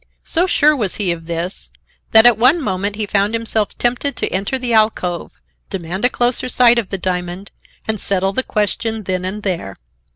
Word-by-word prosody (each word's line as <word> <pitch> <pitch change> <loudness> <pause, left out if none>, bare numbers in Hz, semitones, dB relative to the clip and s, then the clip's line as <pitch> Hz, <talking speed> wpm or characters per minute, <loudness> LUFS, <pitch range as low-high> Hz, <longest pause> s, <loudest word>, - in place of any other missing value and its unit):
So 350 +3 +1
sure 305 -3 +3
was 210 -9 -1
he 195 -4 0
of 165 -1 -6
this, 170 +2 -2 0.4
that 220 +1 +8
at 240 -1 +7
one 255 +10 +4
moment 205 - -2
he 215 0 -1
found 205 +2 0
himself 225 -2 -2
tempted 245 +3 0
to - - 0
enter 195 +8 -1
the 250 -2 -2
alcove, 215 -6 0 0.3
demand 185 +1 -5
a - - +5
closer 245 0 0
sight 240 -1 +5
of 215 - -4
the 195 - -3
diamond 180 +1 -4 0.4
and 220 -1 -2
settle 195 0 -1
the 260 - +1
question 220 0 -1
then 185 -1 -2
and 205 +3 -4
there. 170 - -3
210 Hz, 190 wpm, -18 LUFS, 185-240 Hz, 0.4 s, that